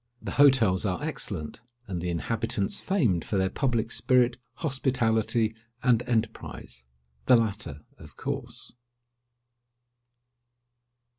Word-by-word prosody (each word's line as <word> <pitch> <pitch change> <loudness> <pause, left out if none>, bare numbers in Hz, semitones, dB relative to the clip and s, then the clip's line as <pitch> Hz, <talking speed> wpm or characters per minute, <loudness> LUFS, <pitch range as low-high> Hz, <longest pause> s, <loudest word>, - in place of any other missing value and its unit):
The - - -6
hotels 130 -10 +5
are 95 +6 -1
excellent, 100 - -4 0.3
and 90 -4 -3
the 90 - -2
inhabitants 100 +4 -1
famed 120 - +1
for 100 - -2
their 95 0 +1
public 120 -3 0
spirit, 125 -2 +3 0.2
hospitality, 115 -6 +1 0.3
and 120 -3 +4
enterprise—the 65 - -1
latter, 105 -10 -2 0.2
of - - -14
course. - - -4
110 Hz, 95 wpm, -27 LUFS, 90-125 Hz, 0.3 s, hotels